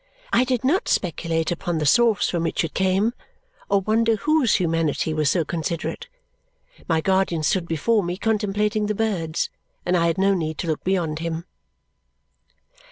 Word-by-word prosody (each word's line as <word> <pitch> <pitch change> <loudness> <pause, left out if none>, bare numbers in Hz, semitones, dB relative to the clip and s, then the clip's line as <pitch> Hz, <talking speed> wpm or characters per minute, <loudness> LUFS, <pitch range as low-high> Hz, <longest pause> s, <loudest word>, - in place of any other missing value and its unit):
I 250 - +4
did 255 -2 -1
not 315 +9 +1
speculate 165 -2 0
upon 175 0 -2
the 155 - -1
source 230 - +4
from 170 - -1
which 165 - 0
it 165 - -4
came 190 +4 +1 0.6
or 200 -1 +3
wonder 225 +3 +2
whose 300 +1 +2
humanity 165 -3 0
was 155 -2 +1
so 170 -1 +1
considerate. 170 - -3 0.8
My 160 -1 +2
guardian 190 -2 +1
stood 170 +3 +1
before 190 +8 +1
me, 175 0 -3
contemplating 210 -1 0
the 210 - -1
birds, 175 -7 -1 0.3
and 180 - +1
I 170 -1 +3
had 165 - 0
no 195 +1 +3
need 160 -4 -2
to - - -3
look 155 -2 -2
beyond 170 -5 0
him. 165 0 -4
180 Hz, 165 wpm, -23 LUFS, 165-210 Hz, 0.8 s, I